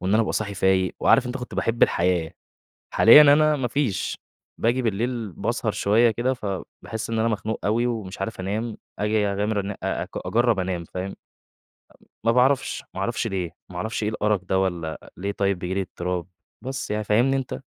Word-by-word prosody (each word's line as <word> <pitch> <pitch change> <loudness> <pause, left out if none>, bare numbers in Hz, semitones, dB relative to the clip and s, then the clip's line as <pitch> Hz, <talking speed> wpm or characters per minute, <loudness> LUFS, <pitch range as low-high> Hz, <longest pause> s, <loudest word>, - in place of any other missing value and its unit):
وإن 95 +2 -1
أنا 115 - +4
أبقى - - -2
صاحي 100 -2 -2
فايِق 95 -1 +2
وعارِف. 135 - +4
أنتَ 125 +1 -3
كنت 125 -1 -7
باحِب 115 +1 -1
الحياة، 85 -1 +2 0.6
حاليًا 115 +7 +9
أنا 150 +1 +6
ما 130 -3 -1
فيش، 125 -5 -1 0.4
باجي 120 +3 +2
بالليل 115 -1 -2
باسهر - - -1
شوية 115 +3 +3
كده، 120 +4 0
فباحس 105 0 -6
إن 115 - -1
أنا 115 - +2
مخنوق 110 0 -2
أوي 115 +4 +2
ومش 105 -5 -4
عارِف 110 -3 -4
أنام، 105 +4 -3 0.2
أجي 105 0 +1
أغامر 100 0 -1
أ - - -2
أجرّب 120 -3 +1
أنام، 90 -2 -2
فاهم؟ 90 +3 -5
امم، 95 - -7 1.1
ما 115 - +4
باعرفش 130 +2 +2
ما 95 - -4
اعرفش 115 +3 -1
ليه، 95 -5 -2 0.2
ما 90 - -9
اعرفش 110 +4 -3
إيه 105 - +1
الأرق 105 -2 0
ده 95 +1 +1
والّا 85 -4 -3
ليه 100 +3 -3
طيب 100 -2 0
بييجي 90 +1 -3
لي 100 - 0
اضطراب، 90 -1 -3 0.4
بس 130 -3 -4
يعني 105 0 -1
فاهمني 120 +6 +3
أنت؟ 135 -2 -4
105 Hz, 185 wpm, -24 LUFS, 95-120 Hz, 1.1 s, حاليًا